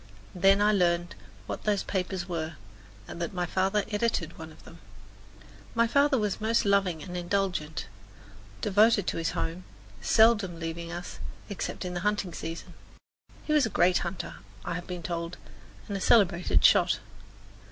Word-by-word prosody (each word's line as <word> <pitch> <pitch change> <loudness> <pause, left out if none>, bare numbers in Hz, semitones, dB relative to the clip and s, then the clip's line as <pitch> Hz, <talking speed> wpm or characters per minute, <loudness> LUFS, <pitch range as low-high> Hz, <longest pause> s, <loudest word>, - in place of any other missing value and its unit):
Then 195 +2 +4
I 210 - +5
learned 175 -3 +1 0.3
what - - -5
those 205 -2 +1
papers 185 -2 -3
were, 165 -2 -3 0.5
and 170 - -7
that 170 +3 -3
my 180 0 0
father 195 +3 +1
edited 205 -6 -1
one 160 0 -8
of - - -17
them. 165 - -14 1.0
My 230 - +4
father 280 +3 +3
was 210 -2 -1
most 225 +1 +2
loving 195 -5 +2
and 180 -2 -7
indulgent, 175 -3 -1 0.8
devoted 210 0 +4
to - - -2
his 165 0 0
home, 170 +3 -3 0.4
seldom 220 -6 +4
leaving 170 0 -5
us, 175 +1 -7 0.3
except 200 -1 -4
in 180 - -4
the 175 - -2
hunting 205 -2 -1
season. 165 +2 -6 0.7
He 305 - 0
was 295 -6 +4
a - - -5
great 180 -2 +3
hunter, 175 +2 -5 0.3
I - - -2
have 175 +1 -5
been 180 -2 -6
told, 170 +1 -4 0.5
and 200 - -4
a 195 - -3
celebrated 175 - +4
shot. - - +5
185 Hz, 160 wpm, -28 LUFS, 170-205 Hz, 1.0 s, I